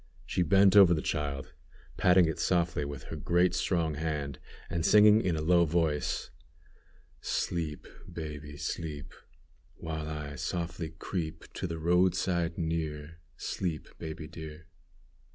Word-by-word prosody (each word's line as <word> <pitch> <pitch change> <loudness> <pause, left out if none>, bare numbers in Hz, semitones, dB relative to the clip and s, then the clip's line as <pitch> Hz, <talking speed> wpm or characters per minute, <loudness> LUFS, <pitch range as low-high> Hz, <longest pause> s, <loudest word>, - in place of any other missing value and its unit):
She - - -1
bent 95 +3 +5
over 95 -4 +8
the 75 - -2
child, 70 -3 -3 0.4
patting 90 -1 +5
it 80 -1 -2
softly 85 -4 +1
with 70 -2 -6
her 80 - -7
great 85 +4 +2
strong 85 -4 0
hand, 75 -3 -3 0.3
and 85 -1 -2
singing 105 +3 +7
in 90 -6 0
a 75 - -2
low 85 +1 +5
voice: 80 -2 0 0.9
"Sleep! 80 -4 -2 0.3
baby, 75 -2 -7
sleep! 75 -2 -5 0.6
While 80 -1 -5
I 75 -2 -5
softly 85 +1 -3
creep 80 -4 -4
To - - -3
the 85 -1 -4
roadside 85 0 +1
near; 80 -1 -3 0.2
Sleep, 85 -5 -3
baby, 80 0 -6
dear." 80 -1 -9
80 Hz, 130 wpm, -30 LUFS, 75-85 Hz, 0.9 s, over